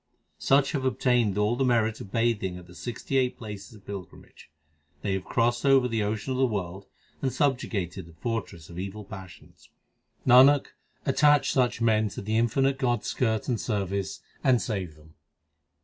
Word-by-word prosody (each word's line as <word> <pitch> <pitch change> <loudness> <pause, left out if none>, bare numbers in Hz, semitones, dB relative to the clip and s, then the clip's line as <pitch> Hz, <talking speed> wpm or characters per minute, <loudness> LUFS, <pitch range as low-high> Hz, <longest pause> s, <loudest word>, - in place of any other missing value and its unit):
Such 135 0 +3
have 140 -4 -2
obtained 125 -5 +1
all 105 +3 +2
the 135 - 0
merit 115 -3 +1
of 95 - -10
bathing 115 -6 0
at 90 - -11
the 90 - -15
sixty 120 +7 -3
eight 125 -1 +1
places 105 -1 -8
of 100 -3 -17
pilgrimage: 100 -6 -10 0.5
They 100 - 0
have 95 -1 -2
crossed 120 +2 0
over 135 -2 +5
the 115 -2 -1
ocean 105 +4 -2
of 130 - -2
the 135 - +4
world 95 -3 -4 0.3
and 130 - 0
sub 135 -3 +1
jugated 95 -6 -4
the 85 - -15
fortress 100 -9 -4
of 85 +1 -9
evil 100 +3 -5
passions. 95 -3 -12 0.6
Nanak, 130 +3 +6 0.4
such 145 -2 +4
attach 125 -3 +1
men 110 -2 +3
to - - -7
the 110 +2 -1
infinite 135 +4 +1
God 120 -3 +1
s - - -4
skirt 110 -4 0
and 120 -5 -1
service, 100 -2 -2 0.2
and 130 -3 +4
save 95 -10 -4
them. 80 +1 -19
110 Hz, 180 wpm, -27 LUFS, 100-125 Hz, 0.6 s, Nanak